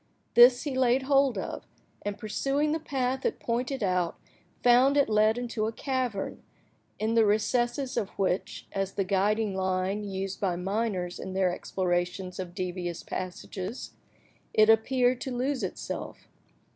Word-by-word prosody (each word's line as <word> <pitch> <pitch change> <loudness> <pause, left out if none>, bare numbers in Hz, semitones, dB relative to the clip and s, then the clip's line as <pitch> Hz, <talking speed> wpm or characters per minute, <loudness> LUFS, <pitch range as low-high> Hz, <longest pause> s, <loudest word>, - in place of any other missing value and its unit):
This 245 +1 +7
he 285 -4 -3
laid 260 0 +3
hold 275 -1 +3
of, - - -5 0.3
and, 205 0 -4
pursuing 275 +7 0
the 320 - 0
path 265 -3 -2
it - - -1
pointed 245 +2 -2
out, 180 -3 0 0.5
found 250 +4 +5
it 285 - +4
led 215 +1 +3
into 235 -3 -2
a - - -2
cavern, 250 -5 -3 0.6
in 220 +1 0
the 230 -1 +5
recesses 240 +5 +1
of 200 - 0
which, 190 -1 -1
as 195 0 -2
the 200 - 0
guiding 200 +2 +1
line 190 +2 -1
used 195 -1 -4
by 185 -3 +1
miners 190 -1 -2
in 190 - -6
their 185 -2 +2
explorations 180 0 -2
of 180 -1 -6
devious 180 -2 -4
passages, 185 +4 -5 0.6
it 215 +1 +7
appeared 245 +2 +2
to 260 -2 -4
lose 260 +2 -1
itself. - - -5
215 Hz, 145 wpm, -28 LUFS, 190-250 Hz, 0.6 s, This